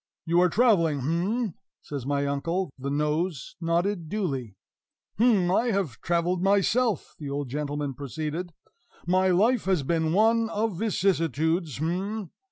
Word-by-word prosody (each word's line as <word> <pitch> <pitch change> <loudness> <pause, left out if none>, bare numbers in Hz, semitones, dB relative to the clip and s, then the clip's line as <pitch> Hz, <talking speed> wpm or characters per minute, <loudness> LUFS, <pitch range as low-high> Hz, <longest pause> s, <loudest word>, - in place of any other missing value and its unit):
"You 170 +1 +3
are 180 - +4
traveling, 185 - +3
h'm?" 180 - -1 0.3
says 140 -3 -6
my 140 0 0
uncle. 165 +5 -1
The 135 +1 -3
nose 150 +3 -1
nodded 170 +1 0
duly. 135 - -3 0.6
"H'm! 210 -7 +4
I 230 +6 +2
have 195 - -1
traveled, 175 +1 0
myself," 205 +4 +2
the 145 -3 -5
old 140 -1 -3
gentleman 145 0 -3
proceeded; 155 +6 -4 0.5
"my 185 +2 +3
life 215 +7 +3
has 185 -6 +1
been 160 +2 0
one 225 +4 +3
of 210 -4 -2
vicissitudes, 165 - 0
h'm! 185 +6 -3
175 Hz, 135 wpm, -26 LUFS, 150-200 Hz, 0.6 s, are